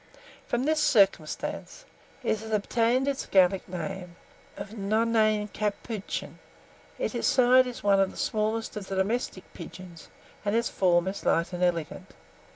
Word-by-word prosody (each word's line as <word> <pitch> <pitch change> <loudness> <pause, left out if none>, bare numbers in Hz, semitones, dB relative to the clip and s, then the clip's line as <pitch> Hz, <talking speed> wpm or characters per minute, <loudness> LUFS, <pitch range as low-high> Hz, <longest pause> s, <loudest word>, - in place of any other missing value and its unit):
From 240 +1 0
this 310 +2 +1
circumstance, 210 - +1 0.4
it 220 - 0
has 220 +1 -8
obtained 230 +5 +1
its 280 -1 -2
Gallic 190 0 +3
name 180 0 -6 0.4
of 200 - -7
nonnain 215 0 +1
capuchin. 210 0 -4 0.6
In - - -1
size 255 0 +5
it - - -2
is 245 - -9
one 200 -1 +4
of 195 -1 +3
the - - -13
smallest 220 +1 -1
of 205 -2 -6
the 195 - -4
domestic 190 0 -1
pigeons, 170 -1 -11 0.3
and 205 +1 0
its 235 0 +1
form 175 -1 +2
is 195 +1 -4
light 170 +2 +1
and 175 - -4
elegant. 170 - -2
205 Hz, 150 wpm, -27 LUFS, 185-230 Hz, 0.6 s, size